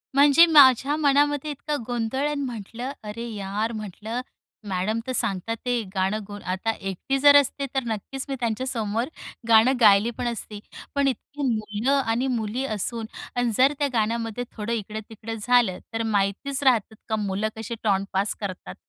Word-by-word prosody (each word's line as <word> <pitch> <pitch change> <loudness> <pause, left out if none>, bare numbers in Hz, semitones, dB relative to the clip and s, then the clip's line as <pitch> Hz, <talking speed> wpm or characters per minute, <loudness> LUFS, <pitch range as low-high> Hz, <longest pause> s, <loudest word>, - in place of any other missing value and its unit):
म्हणजे 285 +4 +7
माझ्या 285 -3 +6
मनामध्ये 290 0 +2
इतका 295 +1 -3
गोंधळ 245 +3 -1
आणि 295 -1 -2
म्हटलं, 240 +2 -6
"अरे 225 +3 -6
यार!" 205 +2 -2
म्हटलं 215 +3 -5 0.5
मॅडम 190 +4 -1
तर - - -1
सांगतात 215 -2 -1
आहे. 245 -1 +1
गाणं 190 +3 +1
गु 205 -1 -7
आता 190 +5 -1
एकटी 195 +6 -3
जर 285 +1 +7
असते, 285 0 +3
तर 265 - +1
नक्कीच 235 +4 -4
मी 270 - -1
त्यांच्यासमोर 230 -1 -1 0.4
गाणं 225 +3 +6
गायले 210 +1 +6
पण 245 - -2
असते. 220 -3 -5 0.4
पण 280 -1 +2
इतकी 275 +2 -4
मुलं 215 +1 -1
आणि 230 +4 0
मुली 230 +4 -2
असून 225 0 -3 0.3
आणि 245 -1 +1
जर 270 +3 +5
त्या 290 - +2
गाण्यामध्ये 230 +1 -1
थोडं 220 +1 -4
इकडं-तिकडं 220 +1 -5
झालं, 240 -5 +3
तर 225 0 -1
माहितीच 205 +8 0
राहतंत 225 -5 +2
का 220 - +1
मुलं 200 +2 -1
कशी 225 +1 -5
टॉण्ट 200 -2 +1
पास 195 +2 0
करतात, 195 -3 -6
230 Hz, 160 wpm, -25 LUFS, 210-265 Hz, 0.5 s, म्हणजे